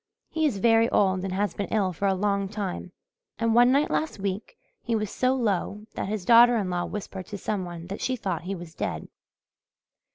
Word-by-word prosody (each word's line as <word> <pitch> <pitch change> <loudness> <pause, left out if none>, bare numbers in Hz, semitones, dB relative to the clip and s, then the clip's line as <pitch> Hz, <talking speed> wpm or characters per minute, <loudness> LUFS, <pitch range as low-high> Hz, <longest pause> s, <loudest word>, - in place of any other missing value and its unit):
He 320 -1 +2
is 240 -9 -2
very 225 +2 +4
old 190 -2 +2
and 195 - -3
has 200 0 0
been 200 - -3
ill 195 -4 0
for 200 +4 -1
a 195 - +2
long 200 0 0
time, 195 -3 -4 0.5
and 230 0 +1
one 245 +2 +6
night 285 +3 +2
last 315 - -1
week 200 - -4 0.2
he 230 - -1
was 215 -2 -2
so 255 +1 +1
low 210 -3 -1
that - - -3
his 210 -3 -3
daughter 240 +1 +7
in 195 -4 -1
law 175 0 -1
whispered 190 -3 -6
to 205 - -6
some 195 -1 -2
one 170 -1 -8
that 195 +3 -6
she 260 - 0
thought 200 -8 -3
he 190 +3 -4
was 170 -2 -9
dead. - - -4
205 Hz, 215 wpm, -26 LUFS, 190-230 Hz, 0.5 s, daughter